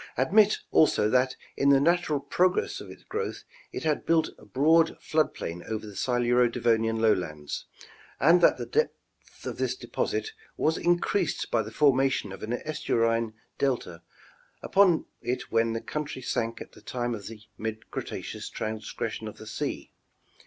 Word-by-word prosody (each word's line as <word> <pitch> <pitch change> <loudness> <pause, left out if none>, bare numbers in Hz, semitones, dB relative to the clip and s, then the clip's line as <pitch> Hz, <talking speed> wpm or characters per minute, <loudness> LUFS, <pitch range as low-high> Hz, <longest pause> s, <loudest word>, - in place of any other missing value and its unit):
Admit, 205 - +4
also, 150 -9 +4
that 130 0 +3 0.2
in 140 - +3
the 140 -1 +6
natural 165 -1 +2
progress 180 +6 +1
of - - -10
its - - -12
growth 450 +1 -4 0.3
it - - -5
had 155 -2 0
built 160 -1 +2
a - - -15
broad 160 +8 +3
flood 155 -1 +1
plain 85 +1 -5
over 110 -1 -3
the 105 -2 -10
Siluro 120 +2 +2
Devonian 115 -1 +1
lowlands, 80 -9 0 0.5
and 170 +5 +6
that - - +5
the - - -4
depth 460 +1 -4
of - - -5
this - - 0
deposit 440 - -2 0.3
was 160 - +2
increased 175 0 0
by 115 - +3
the 110 - -6
formation 135 -4 +2
of 95 - -9
an 110 +2 -3
estuarine 115 -6 0 0.3
delta 120 -11 -1 0.6
upon 190 -4 +4 0.2
it 125 +1 -3
when 115 0 +2
the 115 - -3
country 145 -4 -5
sank 115 -2 -2
at - - -9
the - - -16
time 120 -1 -3
of 105 -4 -6
the 110 -1 -10 0.2
mid 110 0 -5
Cretaceous - - -5
transgression 110 0 -4
of 105 - -8
the - - -10
sea. 110 - -4
125 Hz, 160 wpm, -27 LUFS, 110-155 Hz, 0.6 s, the